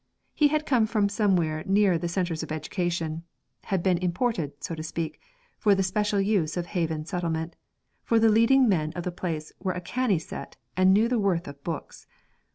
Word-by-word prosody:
He 300 - +4
had 305 +1 0
come 240 -7 +3
from 210 -3 +1
somewhere 180 -7 +1
nearer 195 -1 +4
the 170 +1 -1
centres 170 -2 -1
of 160 - -6
education 165 0 -2 0.4
had 190 -3 -1
been 185 -3 +2
imported, 175 - -1
so - - -3
to 160 - -5
speak, 160 0 -4 0.4
for 205 -2 +4
the 195 - +1
special 205 +2 0
use 195 -6 +1
of 175 - -1
Haven 160 -4 -2
Settlement, 165 -2 -3 0.5
for 230 - +2
the 225 0 +5
leading 230 +4 +5
men 155 -7 +1
of 175 - -4
the 180 - -2
place 165 -3 -4
were 185 -1 -1
a 180 - -4
canny 235 +1 0
set 160 - -8 0.2
and 185 0 +5
knew 210 +4 +4
the 245 -1 +1
worth 190 -5 0
of 140 0 -10
books. 165 -3 -6
180 Hz, 190 wpm, -26 LUFS, 165-210 Hz, 0.5 s, the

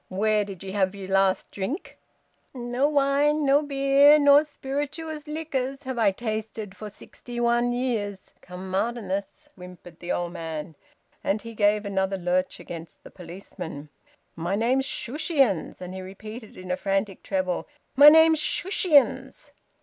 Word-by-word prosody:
Where 210 +2 +1
did 195 -2 -9
ye 190 - -6
have 190 -1 0
yer 195 -1 -7
last 195 0 +1
drink?" 225 - -5 0.6
"No 245 +3 0
wine, 290 +1 +2
no 280 +1 +4
beer, 280 0 +5
nor 285 0 +6
spirituous 295 +2 -5
liquors 285 -3 -3
have 260 -3 -4
I 215 -3 +5
tasted 215 -1 -5
for 215 - -8
sixty 240 +3 -9
one 240 0 +2
years 225 -6 -3
come 180 +1 -9
Martinmas," 205 +5 -3
whimpered 180 -1 -13
the 175 - -5
old 175 0 -2
man. 160 -2 -6 0.5
And 205 +2 -1
he 230 0 -8
gave 210 0 +2
another 195 -1 -1
lurch 180 +1 -1
against 165 -1 -10
the - - -13
policeman. 170 -4 -9 0.5
"My 170 +4 -2
name's 250 +5 +1
Shushions!" 270 - 0
And 180 0 -7
he 190 - -6
repeated 215 +4 -10
in 185 0 -7
a 180 - 0
frantic 195 0 -2
treble, 185 -2 -2 0.3
"My 285 +3 +10
name's 320 0 +6
Shushions!" 340 -4 +2
215 Hz, 145 wpm, -25 LUFS, 190-275 Hz, 0.6 s, My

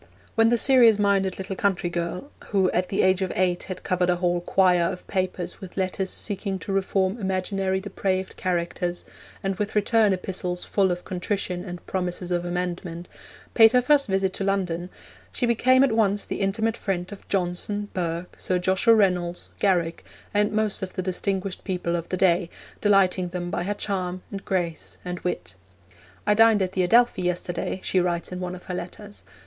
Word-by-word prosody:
When 225 0 +4
the 240 - +3
serious 235 -4 +6
minded 195 -2 +1
little 190 0 -4
country 190 -3 0
girl, 175 +10 -4 0.2
who 190 -3 +2
at 180 0 0
the 195 - +1
age 185 0 +3
of 190 - -1
eight 180 -1 +1
had 185 -1 -7
covered 180 -1 +1
a 180 - +4
whole 175 0 0
quire 180 -1 +3
of 180 - -8
paper 185 -1 -1
with 190 -1 -10
letters 190 0 -1
seeking 195 -1 -3
to 195 - -6
reform 195 +2 0
imaginary 190 0 -1
depraved 190 -1 -2
characters, 175 -1 -2 0.4
and 195 -1 -1
with 210 0 -2
return 210 0 +3
epistles 180 -1 -3
full 195 -2 +2
of 180 0 -3
contrition 180 -1 -2
and 180 -2 -8
promises 180 -1 -3
of 175 0 0
amendment, 175 -1 -4 0.4
paid 225 0 +7
her 250 - +5
first 280 +1 +4
visit 190 -1 +1
to - - -3
London, 180 -3 -1 0.4
she 245 - -1
became 255 +3 +4
at 275 - +3
once 205 -2 +2
the - - -4
intimate 220 +3 0
friend 185 -1 -3
of 205 - -11
Johnson, 195 +2 -1
Burke, 170 0 -3
Sir 185 - 0
Joshua 190 +6 +4
Reynolds, 180 -4 +1
Garrick, 175 -4 +1 0.3
and 210 +1 +2
most 215 -1 0
of 190 -1 -5
the 185 - -2
distinguished 190 +1 -2
people 180 -2 -2
of 170 -1 -4
the 185 - -1
day, 175 -1 +3 0.3
delighting 195 -3 +3
them 175 0 -4
by - - -1
her 205 +2 -1
charm, 185 -3 -3
and 195 -1 -6
grace, 175 -4 -3
and 180 0 -4
wit. 90 - -4 0.7
'I 210 - +4
dined 220 -2 +5
at 185 - -2
the 190 - 0
Adelphi 230 +2 +4
yesterday,' 175 0 -2
she 185 - +1
writes 175 -1 -1
in 180 - -5
one 180 0 -4
of 180 - -12
her 185 - -6
letters. 200 +4 -7
185 Hz, 185 wpm, -25 LUFS, 180-200 Hz, 0.7 s, paid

